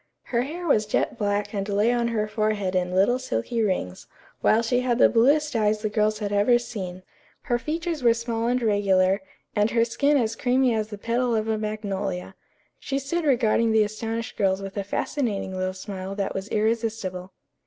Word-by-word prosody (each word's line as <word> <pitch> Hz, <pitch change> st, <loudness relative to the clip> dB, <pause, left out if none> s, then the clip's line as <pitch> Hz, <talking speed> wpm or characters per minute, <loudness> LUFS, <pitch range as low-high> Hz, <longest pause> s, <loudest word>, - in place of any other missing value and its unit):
Her 235 Hz, -1 st, 0 dB
hair 325 Hz, +7 st, -5 dB
was 215 Hz, -9 st, +2 dB
jet -, -, 0 dB
black 205 Hz, 0 st, -1 dB
and 200 Hz, 0 st, -3 dB
lay 205 Hz, +3 st, +2 dB
on 240 Hz, -1 st, +1 dB
her 215 Hz, -2 st, -1 dB
forehead 215 Hz, -3 st, -1 dB
in 180 Hz, 0 st, 0 dB
little 200 Hz, +7 st, +3 dB
silky 235 Hz, -, -2 dB
rings, 185 Hz, -, -2 dB, 0.3 s
while 225 Hz, +2 st, +4 dB
she 245 Hz, +2 st, +1 dB
had 250 Hz, -2 st, 0 dB
the -, -, +6 dB
bluest 285 Hz, +5 st, +3 dB
eyes 215 Hz, -1 st, +1 dB
the 215 Hz, -, 0 dB
girls 215 Hz, 0 st, +1 dB
had 205 Hz, -1 st, -3 dB
ever 205 Hz, +4 st, +4 dB
seen. 185 Hz, -6 st, -6 dB, 0.4 s
Her 240 Hz, -3 st, 0 dB
features 325 Hz, +2 st, -3 dB
were 235 Hz, -2 st, +4 dB
small 230 Hz, 0 st, -2 dB
and 250 Hz, +1 st, +2 dB
regular, 195 Hz, -2 st, +2 dB, 0.3 s
and 210 Hz, +1 st, +3 dB
her 230 Hz, 0 st, +2 dB
skin 285 Hz, +5 st, +2 dB
as 230 Hz, -3 st, 0 dB
creamy 255 Hz, +1 st, +2 dB
as 215 Hz, -1 st, -1 dB
the 210 Hz, -1 st, -8 dB
petal 235 Hz, +3 st, 0 dB
of 215 Hz, 0 st, -1 dB
a 220 Hz, -, +1 dB
magnolia. 200 Hz, -4 st, -3 dB, 0.5 s
She 275 Hz, -, -3 dB
stood 310 Hz, +5 st, -2 dB
regarding 230 Hz, -4 st, +3 dB
the 220 Hz, -1 st, +5 dB
astonished 225 Hz, +2 st, -4 dB
girls 190 Hz, -2 st, +2 dB
with 195 Hz, -1 st, -7 dB
a 200 Hz, -, -2 dB
fascinating 200 Hz, -2 st, -2 dB
little 185 Hz, 0 st, -1 dB
smile 190 Hz, 0 st, -6 dB
that 200 Hz, -1 st, -2 dB
was 195 Hz, +2 st, -5 dB
irresistible. 215 Hz, -4 st, -1 dB
215 Hz, 190 wpm, -25 LUFS, 200-240 Hz, 0.5 s, the